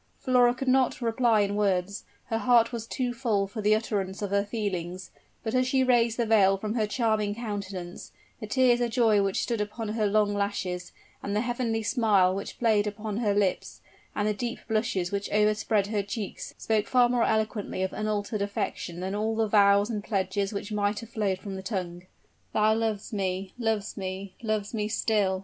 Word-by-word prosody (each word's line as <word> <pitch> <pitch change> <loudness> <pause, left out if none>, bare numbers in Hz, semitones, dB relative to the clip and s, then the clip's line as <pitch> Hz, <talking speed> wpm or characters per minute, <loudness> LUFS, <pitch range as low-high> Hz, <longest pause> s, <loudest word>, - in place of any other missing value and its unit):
Flora 245 -1 +3
could 270 +2 -5
not 260 0 +3
reply 230 -2 +2
in 200 0 0
words 200 -1 0 0.2
her 225 -1 -2
heart 235 -1 +4
was 230 -2 -5
too 250 -2 -2
full 225 -5 0
for 205 +3 -6
the 210 +1 +4
utterance 200 -3 -2
of 200 - -3
her 200 0 +2
feelings; 185 -4 -4 0.3
but 220 -1 -3
as 255 0 +2
she 260 0 +2
raised 240 -2 +3
the 235 - +1
veil 200 -3 +4
from 210 +2 -3
her 220 -3 0
charming 215 -2 0
countenance, 200 -6 -6 0.3
the 215 - -6
tears 245 +1 +3
of 240 - +1
joy 225 -3 +3
which 195 -1 0
stood 230 -3 -1
upon 210 +1 -4
her 215 -1 0
long 205 0 +2
lashes, 200 -3 -2 0.3
and 200 - -3
the 210 - +2
heavenly 240 -2 -1
smile 210 -6 +3
which 195 +1 -5
played 215 -3 +2
upon 210 0 -4
her 210 -4 +1
lips, 200 -3 0 0.4
and 205 - 0
the 210 - +1
deep 235 +3 -4
blushes 215 -5 0
which 200 0 -2
overspread 210 0 +2
her 205 0 -1
cheeks 205 0 -6
spoke 220 -2 0
far 250 -1 +4
more 240 -1 +1
eloquently 215 -3 -1
of 190 - -2
unaltered 215 0 -2
affection 185 -3 -3
than 190 +1 -3
all 215 +2 -1
the 220 0 +1
vows 200 -1 +5
and 210 -2 -3
pledges 195 -1 -1
which 205 +1 -5
might 205 0 0
have 230 - -11
flowed 200 -4 0
from 195 0 -7
the 190 - -5
tongue. 185 -3 -5 0.5
"Thou 215 0 +4
lovest 220 -1 -2
me 190 -1 -2
lovest 220 -3 -1
me 190 0 -5
lovest 215 -2 -2
me 210 -2 -1
still!" 205 -3 +1
210 Hz, 195 wpm, -27 LUFS, 200-225 Hz, 0.5 s, vows